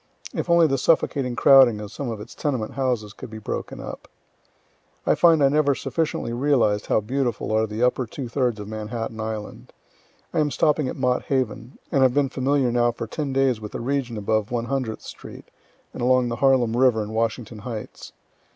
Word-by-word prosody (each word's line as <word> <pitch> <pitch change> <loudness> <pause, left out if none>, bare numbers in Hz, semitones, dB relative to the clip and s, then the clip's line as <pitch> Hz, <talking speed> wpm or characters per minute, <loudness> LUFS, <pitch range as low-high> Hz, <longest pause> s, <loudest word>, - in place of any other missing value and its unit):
(If - - -3
only 170 -1 +6
the 135 -3 +1
suffocating 135 -4 +1
crowding 130 -4 +6
of 105 -1 -7
some 140 -4 -5
of 110 -2 -5
its 105 - -10
tenement 130 -7 -2
houses 120 -6 -1
could 130 - -10
be 110 - -8
broken 110 - -5
up.) - - -8 1.0
I - - +4
find 165 -4 +5
I 135 - +6
never 145 -1 +2
sufficiently 155 -7 -2
realized 120 -6 +1
how - - +2
beautiful 120 0 -2
are 110 0 +2
the 110 +3 -3
upper 125 0 +1
two 130 +3 -6
thirds 120 -2 -1
of 105 - -7
Manhattan 110 +1 -5
island. 110 -1 -6 0.6
I 165 - +1
am 150 -1 +2
stopping 150 -1 +1
at - - -4
Mott 125 0 0
Haven, 130 -1 -2
and 135 - +2
have 130 -1 +4
been 145 -2 +2
familiar 135 -1 +1
now 120 0 +2
for 115 - -6
ten 140 +5 -4
days 130 -4 +1
with 105 - -8
the - - -4
region 125 -2 -2
above 110 +1 0
One 120 -2 -2
hundredth 130 -3 -3
street, - - -10 0.5
and - - -7
along 125 0 +3
the 120 - -3
Harlem 130 -4 +3
river 120 -3 +3
and 105 +1 -7
Washington 115 0 -2
heights. 110 0 -7
125 Hz, 195 wpm, -23 LUFS, 110-135 Hz, 1.0 s, only